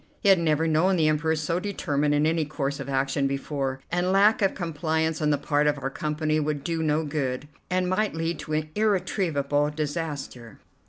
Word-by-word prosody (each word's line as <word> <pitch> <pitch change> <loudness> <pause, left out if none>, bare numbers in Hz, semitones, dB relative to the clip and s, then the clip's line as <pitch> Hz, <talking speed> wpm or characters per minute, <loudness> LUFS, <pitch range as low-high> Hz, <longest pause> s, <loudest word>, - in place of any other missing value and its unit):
He 200 - +3
had 190 -2 +6
never 160 -1 +1
known 165 +5 +3
the 160 -3 +3
Emperor 155 +1 +1
so 160 +3 -1
determined 150 -7 0
in 145 +1 +2
any 160 0 +2
course 140 -2 -3
of - - -6
action 135 +1 +1
before, 135 -1 -3
and 175 +1 +1
lack 205 +4 +4
of 195 - +2
compliance 160 -2 -1
on 150 - +2
the 145 - +3
part 145 +1 +1
of 145 0 +2
our 135 -1 -4
company 155 +1 -1
would 150 -2 -2
do 165 +1 -2
no 155 0 +1
good, 145 -2 -2 0.2
and 180 0 +1
might 200 +1 0
lead 165 -1 -2
to 155 0 -1
irretrievable 175 -8 +1
disaster. 145 -6 -5
155 Hz, 190 wpm, -26 LUFS, 145-170 Hz, 0.2 s, had